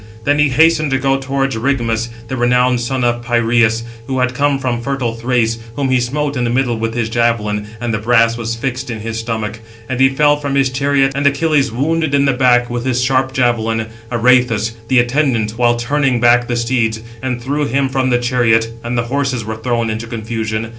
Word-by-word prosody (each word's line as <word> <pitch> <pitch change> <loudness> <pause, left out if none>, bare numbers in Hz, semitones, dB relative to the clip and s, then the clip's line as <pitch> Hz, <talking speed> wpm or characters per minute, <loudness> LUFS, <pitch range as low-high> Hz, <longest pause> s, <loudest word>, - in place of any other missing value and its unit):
Then 145 +3 +1
he 150 -1 +4
hastened 155 +2 +3
to 135 - +1
go 135 0 +1
towards 135 0 -1
Rigmus, 115 -2 -1 0.2
the 130 - -4
renowned 125 0 +2
son 130 +1 -2
of 120 0 0
Pireus, 115 -1 +2 0.2
who 130 - -2
had 125 0 +1
come 145 +1 +1
from 125 -3 -2
fertile 130 -2 -2
Thrace; 115 -1 0 0.2
whom 140 -2 -1
he 130 - +3
smote 140 +4 -2
in 125 - -1
the 120 - 0
middle 125 0 0
with 115 0 -3
his 120 -2 -1
javelin, 115 -3 0
and 120 -1 -2
the 110 - -1
brass 115 +1 +3
was 115 0 -3
fixed 125 +1 -4
in 110 -3 -5
his 115 +1 -4
stomach; 115 -1 -4 0.3
and 130 -1 -3
he 135 0 +5
fell 145 +2 +3
from 140 -1 -3
his 135 -2 +2
chariot: 135 0 +1
and 140 +1 +1
Achilles 145 -2 +1
wounded 155 +4 0
in 140 0 +3
the 135 - +2
back, 125 -1 +3
with 120 0 -4
his 125 -1 0
sharp 130 +1 +1
javelin, 115 -3 0 0.2
Areïthoüs, 120 -2 +2 0.2
the 130 - +2
attendant, 120 -3 +1
while 120 -1 +3
turning 130 +1 0
back 120 +1 +4
the 120 - -1
steeds, 115 -2 0 0.2
and 130 -2 -3
threw 145 +4 -2
him 135 +2 +1
from 130 0 0
the 120 - +3
chariot: 120 -2 +1
and 120 +1 -3
the 120 - +1
horses 130 -2 -2
were 110 0 -4
thrown 115 0 -1
into 110 +2 -5
confusion. 110 -1 -4
120 Hz, 210 wpm, -16 LUFS, 115-135 Hz, 0.3 s, he